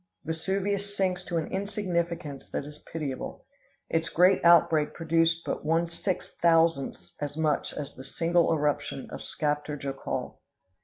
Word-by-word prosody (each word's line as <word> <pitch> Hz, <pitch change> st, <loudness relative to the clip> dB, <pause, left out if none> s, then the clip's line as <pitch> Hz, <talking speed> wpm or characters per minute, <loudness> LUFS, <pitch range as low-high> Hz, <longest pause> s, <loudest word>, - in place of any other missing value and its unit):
Vesuvius 195 Hz, +5 st, -1 dB
sinks 185 Hz, -1 st, +1 dB
to 175 Hz, -, -2 dB
an 160 Hz, -, 0 dB
insignificance 175 Hz, -7 st, -2 dB
that -, -, -3 dB
is 150 Hz, 0 st, -11 dB
pitiable; 145 Hz, -5 st, -4 dB, 0.4 s
its 165 Hz, 0 st, 0 dB
great 180 Hz, +3 st, +4 dB
outbreak 165 Hz, -3 st, +5 dB
produced 165 Hz, 0 st, +2 dB
but -, -, -3 dB
one 165 Hz, +2 st, +2 dB
six 170 Hz, +3 st, -2 dB
thousandths 165 Hz, -4 st, +2 dB
as 145 Hz, +1 st, -3 dB
much 155 Hz, -3 st, +1 dB
as 145 Hz, -2 st, -5 dB
the 130 Hz, -, -10 dB
single 170 Hz, +5 st, +2 dB
eruption 145 Hz, -3 st, 0 dB
of -, -, -6 dB
Skaptar 150 Hz, -1 st, -2 dB
Jokul! 135 Hz, -1 st, -4 dB
165 Hz, 140 wpm, -28 LUFS, 150-175 Hz, 0.4 s, outbreak